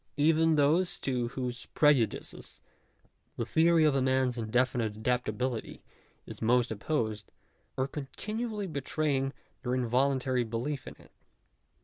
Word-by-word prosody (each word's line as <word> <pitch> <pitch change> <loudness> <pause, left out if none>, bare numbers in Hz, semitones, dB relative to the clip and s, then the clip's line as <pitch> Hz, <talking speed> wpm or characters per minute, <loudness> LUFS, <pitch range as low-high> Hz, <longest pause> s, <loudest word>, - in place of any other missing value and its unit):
Even 160 +2 +4
those 155 +5 +3
to 125 -3 0
whose 125 0 -4
prejudices 135 -8 +1 0.8
the - - -1
theory 165 0 +4
of 150 -2 +4
man's 130 -1 +2
indefinite 115 -1 0
adaptability 125 +1 -2 0.4
is - - -10
most 120 +1 +3
opposed, 110 -2 -2 0.5
are 130 0 +1
continu 215 - -4
ally 210 -2 -3
betraying 140 -3 -1 0.3
their 125 0 -1
involuntary 130 +1 +1
belief 120 +5 -4
in - - -8
it. - - -19
130 Hz, 115 wpm, -30 LUFS, 120-150 Hz, 0.8 s, Even